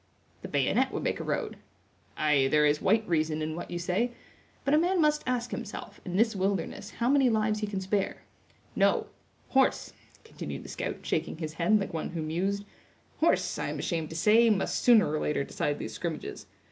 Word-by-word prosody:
"The -, -, -6 dB
bayonet -, -, +1 dB
would -, -, -3 dB
make -, -, -1 dB
a -, -, -3 dB
road." -, -, -2 dB, 0.6 s
"Ay, 150 Hz, -3 st, +3 dB
there 150 Hz, +2 st, +4 dB
is 150 Hz, 0 st, +2 dB
white 220 Hz, +3 st, +2 dB
reason 155 Hz, -2 st, +1 dB
in 155 Hz, 0 st, -3 dB
what 175 Hz, -, -6 dB
you 175 Hz, -, -3 dB
say; 180 Hz, +8 st, 0 dB, 0.6 s
but 275 Hz, -, +2 dB
a 305 Hz, -, +6 dB
man 360 Hz, +2 st, +2 dB
must 300 Hz, -1 st, +3 dB
ask 245 Hz, -1 st, -1 dB
himself, -, -, -7 dB
in 180 Hz, -2 st, -5 dB
this 225 Hz, 0 st, +3 dB
wilderness, 195 Hz, +1 st, -2 dB
how 235 Hz, -, 0 dB
many 270 Hz, -1 st, +4 dB
lives 215 Hz, -1 st, +1 dB
he 210 Hz, -, -2 dB
can 200 Hz, -2 st, -3 dB
spare. 195 Hz, +1 st, -1 dB, 0.5 s
No—horse," 265 Hz, -1 st, 0 dB, 0.3 s
continued 450 Hz, -, -7 dB
the -, -, -10 dB
scout, -, -, -4 dB
shaking -, -, -1 dB
his 155 Hz, -2 st, -5 dB
head, 175 Hz, +6 st, +3 dB
like 195 Hz, -, -4 dB
one 160 Hz, -, -3 dB
who 165 Hz, -2 st, -4 dB
mused; 190 Hz, +6 st, -1 dB, 0.5 s
"horse, -, -, +2 dB
I -, -, -2 dB
am -, -, -4 dB
ashamed 160 Hz, -3 st, -2 dB
to 160 Hz, -, -8 dB
say 220 Hz, +7 st, +5 dB
must 200 Hz, -3 st, +1 dB
sooner 235 Hz, -3 st, +6 dB
or 155 Hz, +1 st, -1 dB
later 150 Hz, -2 st, 0 dB
decide 145 Hz, +1 st, -2 dB
these 110 Hz, -, -6 dB
scrimmages. 165 Hz, +4 st, -5 dB
190 Hz, 195 wpm, -29 LUFS, 160-225 Hz, 0.6 s, a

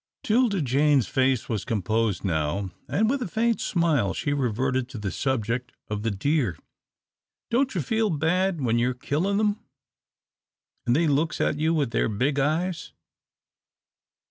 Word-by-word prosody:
'Tilda 215 Hz, -6 st, +2 dB
Jane's 140 Hz, -2 st, +3 dB
face 130 Hz, -2 st, +1 dB
was 110 Hz, -5 st, -2 dB
composed 110 Hz, -2 st, -1 dB
now, 85 Hz, +3 st, -1 dB, 0.2 s
and 220 Hz, +3 st, +1 dB
with 270 Hz, +3 st, 0 dB
a 240 Hz, -, -2 dB
faint 230 Hz, +5 st, 0 dB
smile 155 Hz, -, +1 dB
she 145 Hz, -2 st, -1 dB
reverted 130 Hz, 0 st, 0 dB
to 130 Hz, -, -8 dB
the 105 Hz, -3 st, -3 dB
subject 125 Hz, -1 st, -2 dB, 0.2 s
of 105 Hz, -1 st, -3 dB
the 115 Hz, -, 0 dB
deer. 115 Hz, -, 0 dB, 0.9 s
"Don't 260 Hz, 0 st, +1 dB
you 170 Hz, -, 0 dB
feel 220 Hz, +3 st, +1 dB
bad 170 Hz, +2 st, +1 dB
when 120 Hz, -2 st, +1 dB
you're 125 Hz, +1 st, +1 dB
killin' 170 Hz, +10 st, -1 dB
them, 210 Hz, 0 st, +1 dB, 1.3 s
an' 120 Hz, -, +4 dB
they 165 Hz, +6 st, +3 dB
looks 155 Hz, +2 st, +1 dB
at 150 Hz, -, 0 dB
you 160 Hz, +1 st, +2 dB
with 140 Hz, -6 st, 0 dB
their 115 Hz, -, +1 dB
big 135 Hz, +7 st, 0 dB
eyes?" 160 Hz, +5 st, -1 dB
140 Hz, 150 wpm, -25 LUFS, 115-170 Hz, 1.3 s, an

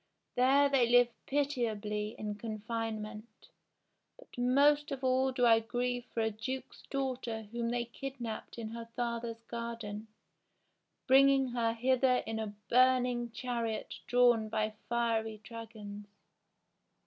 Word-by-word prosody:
There 270 Hz, +3 st, +5 dB
they 265 Hz, -4 st, +3 dB
live 245 Hz, 0 st, +6 dB, 0.2 s
pitiably 220 Hz, -7 st, -1 dB
in 210 Hz, -1 st, -3 dB
confinement; 220 Hz, 0 st, -5 dB, 0.7 s
but -, -, -16 dB
most 285 Hz, +4 st, +3 dB
of 270 Hz, -1 st, -4 dB
all 260 Hz, +1 st, +3 dB
do 250 Hz, -1 st, +2 dB
I 225 Hz, -1 st, +7 dB
grieve 245 Hz, +1 st, -2 dB
for 230 Hz, -, -3 dB
a 220 Hz, 0 st, +1 dB
duke's 255 Hz, +5 st, -6 dB
daughter 255 Hz, -5 st, -2 dB
whom 235 Hz, 0 st, -2 dB
they 240 Hz, 0 st, -1 dB
kid 270 Hz, +3 st, -7 dB
napped 230 Hz, -1 st, -6 dB
in 225 Hz, -2 st, -5 dB
her 230 Hz, 0 st, -7 dB
father's 235 Hz, -1 st, -3 dB
garden, 230 Hz, -2 st, -5 dB, 1.0 s
bringing 270 Hz, 0 st, +5 dB
her 235 Hz, -2 st, 0 dB
hither 255 Hz, +1 st, +3 dB
in 220 Hz, 0 st, -3 dB
a 210 Hz, -2 st, -4 dB
burn 255 Hz, 0 st, +5 dB
ing 240 Hz, -1 st, -2 dB
chariot 235 Hz, -2 st, -3 dB
drawn 240 Hz, -3 st, +4 dB
by 215 Hz, 0 st, -1 dB, 0.2 s
fiery 225 Hz, -2 st, 0 dB
dragons. 215 Hz, -3 st, -9 dB
235 Hz, 130 wpm, -32 LUFS, 225-255 Hz, 1.0 s, I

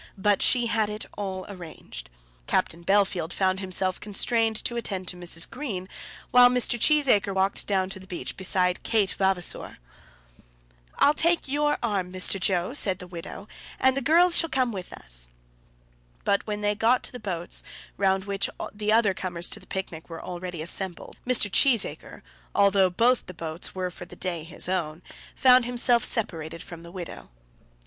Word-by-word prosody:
But 205 Hz, +1 st, +2 dB
she 245 Hz, -1 st, +5 dB
had 220 Hz, -2 st, 0 dB
it 210 Hz, 0 st, -4 dB
all 190 Hz, -2 st, -4 dB
arranged. 160 Hz, -, -10 dB, 0.4 s
Captain 170 Hz, +1 st, 0 dB
Bellfield 190 Hz, -3 st, +1 dB
found 185 Hz, 0 st, 0 dB
himself 185 Hz, -1 st, -1 dB
constrained 225 Hz, +2 st, 0 dB
to 240 Hz, -, 0 dB
attend 195 Hz, -6 st, -3 dB
to -, -, -4 dB
Mrs. 175 Hz, -2 st, -1 dB
Green, 230 Hz, -8 st, -5 dB, 0.4 s
while 245 Hz, 0 st, +8 dB
Mr. 245 Hz, -1 st, +1 dB
Cheesacre 245 Hz, -9 st, +3 dB
walked 190 Hz, +1 st, 0 dB
down 190 Hz, -2 st, +1 dB
to 190 Hz, -, -6 dB
the 190 Hz, -, -14 dB
beach 180 Hz, -2 st, -5 dB
beside 185 Hz, -1 st, +1 dB
Kate 210 Hz, -4 st, +1 dB
Vavasor. 190 Hz, -2 st, -1 dB, 1.2 s
"I'll 290 Hz, -, +5 dB
take 335 Hz, +2 st, +1 dB
your 295 Hz, +2 st, +1 dB
arm, 195 Hz, -5 st, -1 dB
Mr. 185 Hz, +1 st, +1 dB
Joe," 185 Hz, +3 st, 0 dB
said 195 Hz, -10 st, +2 dB
the 180 Hz, -, -9 dB
widow, 180 Hz, +3 st, -9 dB, 0.3 s
"and 260 Hz, 0 st, +4 dB
the 275 Hz, -, 0 dB
girls 340 Hz, +6 st, +5 dB
shall 330 Hz, -, +5 dB
come 260 Hz, -3 st, +1 dB
with 185 Hz, -4 st, -7 dB
us." -, -, -5 dB, 0.9 s
But 200 Hz, -, 0 dB
when 210 Hz, -1 st, -3 dB
they 205 Hz, 0 st, +2 dB
got 230 Hz, +4 st, +2 dB
to -, -, -4 dB
the 250 Hz, -, -8 dB
boats, 175 Hz, -5 st, -3 dB, 0.3 s
round 190 Hz, -1 st, +1 dB
which 200 Hz, -1 st, -1 dB, 0.2 s
the 210 Hz, 0 st, -1 dB
other 220 Hz, -3 st, +4 dB
comers 175 Hz, -2 st, -4 dB
to -, -, -2 dB
the -, -, -19 dB
picnic 175 Hz, -4 st, -6 dB
were 165 Hz, -1 st, -7 dB
already 180 Hz, -2 st, -5 dB
assembled, 180 Hz, +1 st, -1 dB
Mr. 250 Hz, -4 st, +4 dB
Cheesacre, 230 Hz, +1 st, +1 dB, 0.3 s
although 200 Hz, -2 st, +4 dB
both 235 Hz, +7 st, +2 dB
the 185 Hz, -, -9 dB
boats 165 Hz, +2 st, -5 dB
were 185 Hz, -1 st, -3 dB
for 180 Hz, -, -9 dB
the -, -, -13 dB
day 175 Hz, -4 st, -3 dB
his 165 Hz, -, 0 dB
own, 170 Hz, -3 st, -2 dB, 0.3 s
found 255 Hz, -1 st, +6 dB
himself 245 Hz, 0 st, +3 dB
separated 165 Hz, -7 st, -1 dB
from 170 Hz, -3 st, -10 dB
the 170 Hz, 0 st, -12 dB
widow. 175 Hz, -2 st, -8 dB
195 Hz, 170 wpm, -26 LUFS, 180-230 Hz, 1.2 s, while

